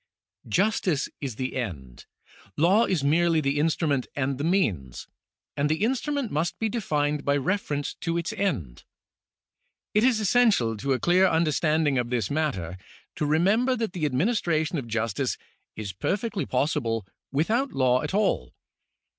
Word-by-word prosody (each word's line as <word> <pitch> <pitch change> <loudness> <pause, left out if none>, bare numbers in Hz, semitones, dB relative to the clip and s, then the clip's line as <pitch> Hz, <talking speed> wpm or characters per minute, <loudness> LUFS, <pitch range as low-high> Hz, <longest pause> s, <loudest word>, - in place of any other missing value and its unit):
Justice 180 - +1
is 135 -6 -4
the 130 +2 -4
end, 75 - -6 0.5
law 190 +9 +4
is 175 -7 0
merely 165 +3 +3
the 140 -1 0
instrument 150 -3 +1
and 135 -1 -1
the - - -2
means; 100 - 0 0.5
and 145 +1 +1
the 160 +6 0
instrument 265 +1 -1
must 160 +4 -1
be 225 - -1
defined 150 -9 -1
by 140 0 +2
reference 145 -2 -1
to 170 -1 -1
its 170 +1 -2
end. 110 - -2 1.1
It 210 - +3
is 245 -3 +4
essential 210 - +3
to 135 +6 0
a 130 - -1
clear 185 +2 +4
understanding 155 -3 +2
of 120 -1 -2
this 125 +1 -1
matter 95 - -2 0.4
to 150 - -1
remember 200 - +3
that 225 -5 -3
the 160 -4 0
administration 160 - 0
of 125 - -7
justice 115 -3 -1 0.4
is 105 -3 -5
perfectly 200 - -2
pos 140 +5 +1
sible 115 -7 -1 0.3
without 220 - +1
law 130 -1 +3
at - - -3
all. 195 - 0
155 Hz, 150 wpm, -26 LUFS, 130-190 Hz, 1.1 s, law